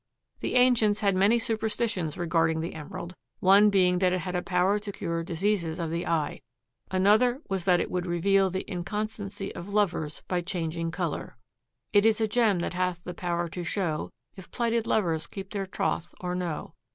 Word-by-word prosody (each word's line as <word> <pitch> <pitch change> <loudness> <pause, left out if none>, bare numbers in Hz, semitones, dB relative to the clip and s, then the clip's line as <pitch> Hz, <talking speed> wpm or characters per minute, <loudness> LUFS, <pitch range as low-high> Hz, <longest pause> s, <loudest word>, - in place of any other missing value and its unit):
The - - -2
ancients 240 -5 +4
had 200 -2 +3
many 200 +5 +4
superstitions 220 -6 -1
regarding 165 -2 +1
the 165 +2 -3
emerald, 160 +3 -7 0.3
one 200 +3 +6
being 180 -3 +3
that 185 -1 +3
it 185 0 0
had 180 0 -4
a 180 - +1
power 185 +3 +2
to 205 0 -6
cure 170 -4 -3
diseases 170 -1 -1
of 165 -2 -3
the 170 +1 -2
eye. 155 -3 -1 0.5
Another 215 +7 +3
was 190 -3 -1
that 180 -2 +4
it - - -2
would 180 0 -2
reveal 190 +3 +3
the 190 +1 -3
inconstancy 200 +2 -4
of 175 +3 -8
lovers 175 -7 0
by 180 -1 0
changing 170 -2 -3
color. 165 -7 -4 0.6
"It 205 -1 +6
is 225 0 +4
a 220 - +2
gem 215 -3 +3
that 175 - -2
hath 180 -1 -1
the 180 - -6
power 175 -1 -2
to 175 +2 -5
show 170 -3 -2 0.3
If 190 -3 -12
plighted 235 -1 0
lovers 165 -7 +1
keep 195 -1 -8
their 195 -2 -3
troth 175 -2 -2
or 180 -1 -3
no. 175 -3 -4
185 Hz, 185 wpm, -27 LUFS, 170-205 Hz, 0.6 s, one